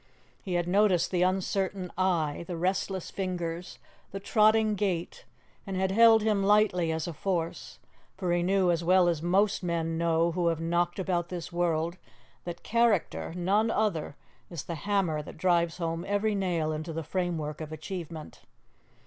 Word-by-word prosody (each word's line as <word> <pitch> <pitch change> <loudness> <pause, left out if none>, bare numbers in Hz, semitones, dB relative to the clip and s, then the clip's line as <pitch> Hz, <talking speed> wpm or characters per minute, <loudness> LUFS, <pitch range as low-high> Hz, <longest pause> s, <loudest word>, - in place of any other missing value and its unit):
He 185 -4 -3
had 175 0 0
noticed 190 -1 +3
the 180 -2 +1
uncertain 190 0 0
eye, 170 -5 0
the 175 -2 -4
restless 190 +1 -2
fingers, 180 -2 -4 0.3
the 195 - -6
trotting 215 +1 +3
gait, 200 - -2 0.4
and 190 -1 -3
had 190 0 0
held 225 +1 +6
him 210 -2 +1
lightly 195 -5 +3
as 160 -1 -2
a 170 - -4
force; 170 0 -3 0.4
for 180 -3 -1
he 175 - +2
knew 185 0 +2
as 170 0 -1
well 180 +1 +4
as 165 -3 0
most 195 +5 +2
men 165 -2 -2
know 170 0 +2
who 175 0 0
have 165 -1 +1
knocked 175 +1 0
about 175 -2 -1
this 180 -1 -6
world 170 0 0 0.5
that 175 -1 -7
character 230 -8 +1
none 200 +5 +1
other 200 -11 -1 0.3
is 170 -5 -6
the 170 - -5
hammer 175 -2 0
that 150 - -11
drives 170 -1 +1
home 165 -1 -3
every 205 +2 +1
nail 175 -6 0
into 155 +2 -4
the 165 +1 -4
framework 160 -3 -3
of 155 -1 -6
achievement. 165 -1 -7
175 Hz, 165 wpm, -28 LUFS, 165-195 Hz, 0.5 s, held